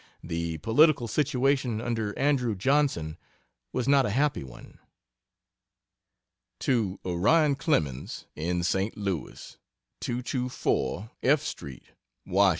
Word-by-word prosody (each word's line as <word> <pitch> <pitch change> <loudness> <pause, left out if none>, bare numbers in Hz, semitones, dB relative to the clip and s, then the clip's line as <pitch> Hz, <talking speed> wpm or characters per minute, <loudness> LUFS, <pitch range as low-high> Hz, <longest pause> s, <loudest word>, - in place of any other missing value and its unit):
The 85 -1 -3
political 120 - +4
situation 130 -2 +1
under 110 -3 -2
Andrew 130 -5 +1
Johnson 120 - +1 0.5
was 125 - -2
not 140 -1 +5
a 125 - 0
happy 140 - +1
one. 65 -2 -13 1.8
To 110 -8 0
Orion 140 - +3
Clemens, 75 - -1
in 85 +3 -1
St. 95 +4 0
Louis: 100 -6 -5 0.4
224 125 -4 -2
F. 145 +2 +4
STREET, 65 -3 -7 0.4
WASH. 100 +2 +4
115 Hz, 100 wpm, -28 LUFS, 90-135 Hz, 1.8 s, not